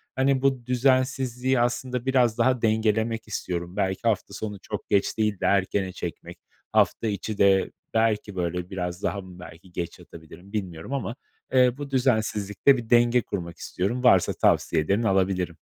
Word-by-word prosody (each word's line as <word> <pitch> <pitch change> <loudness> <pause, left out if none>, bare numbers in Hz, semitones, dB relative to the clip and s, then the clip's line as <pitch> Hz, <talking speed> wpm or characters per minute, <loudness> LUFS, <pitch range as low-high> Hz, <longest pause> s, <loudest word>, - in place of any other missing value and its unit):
Hani 130 0 +2
bu 135 -3 +1
düzensizliği 130 0 +1
aslında 125 +1 -1
biraz 125 -4 +2
daha 125 0 +2
dengelemek 110 0 +1
istiyorum. 90 -3 -4
Belki 95 0 -1
hafta 110 -3 0
sonu 105 0 -5
çok 105 - -6
geç 100 -1 +1
değil 105 -3 0
de - - -2
erkene 95 -1 +1
çekmek, - - -7 0.3
hafta 115 - +2
içi 105 0 -3
de 95 -1 +3 0.2
belki 110 -2 +1
böyle 90 0 -2
biraz 90 -1 -4
daha 100 - -1
mı 90 -1 -13
belki 90 0 -13
geç 85 -1 -5
yatabilirim 85 +4 -14
bilmiyorum 95 +1 -4
ama, 120 -3 -3 0.4
eee, 125 -1 +5
bu 145 -1 -7
düzensizlikte 110 -1 +2
bir 115 -2 -7
denge 120 +1 +4
kurmak 85 -5 -6
istiyorum. 110 +8 -3
Varsa 95 -8 +5
tavsiyelerin 90 +8 +2
alabilirim. 95 -4 0
110 Hz, 155 wpm, -25 LUFS, 95-125 Hz, 0.4 s, eee